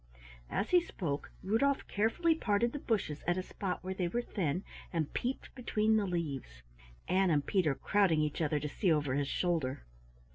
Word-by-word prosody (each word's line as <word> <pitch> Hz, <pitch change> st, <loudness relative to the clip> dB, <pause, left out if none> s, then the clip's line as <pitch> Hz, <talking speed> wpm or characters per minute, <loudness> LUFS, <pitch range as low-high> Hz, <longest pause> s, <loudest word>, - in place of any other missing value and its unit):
As 205 Hz, -, -1 dB
he 355 Hz, -1 st, +7 dB
spoke 155 Hz, -, -4 dB
Rudolf 250 Hz, +8 st, +2 dB
carefully 230 Hz, +11 st, +2 dB
parted 235 Hz, -5 st, +1 dB
the 290 Hz, -, -3 dB
bushes 195 Hz, -, -1 dB
at 175 Hz, +1 st, +2 dB
a 185 Hz, -, -1 dB
spot 185 Hz, 0 st, -4 dB
where 190 Hz, +1 st, -3 dB
they 185 Hz, -2 st, -1 dB
were 240 Hz, +7 st, -1 dB
thin 180 Hz, -5 st, -1 dB, 0.3 s
and 160 Hz, -4 st, -1 dB
peeped 255 Hz, +2 st, -3 dB
between 220 Hz, -3 st, +1 dB
the 210 Hz, -2 st, +2 dB
leaves, 140 Hz, -, -4 dB, 0.4 s
Ann 190 Hz, +1 st, +3 dB
and 145 Hz, -3 st, +2 dB
Peter 170 Hz, -8 st, +2 dB
crowding 195 Hz, -4 st, +3 dB
each 150 Hz, +1 st, -1 dB
other 150 Hz, -1 st, +1 dB
to 150 Hz, -, -3 dB
see 175 Hz, +5 st, +1 dB
over 145 Hz, -4 st, +2 dB
his 140 Hz, 0 st, 0 dB
shoulder. 160 Hz, -, 0 dB
185 Hz, 180 wpm, -33 LUFS, 150-215 Hz, 0.4 s, he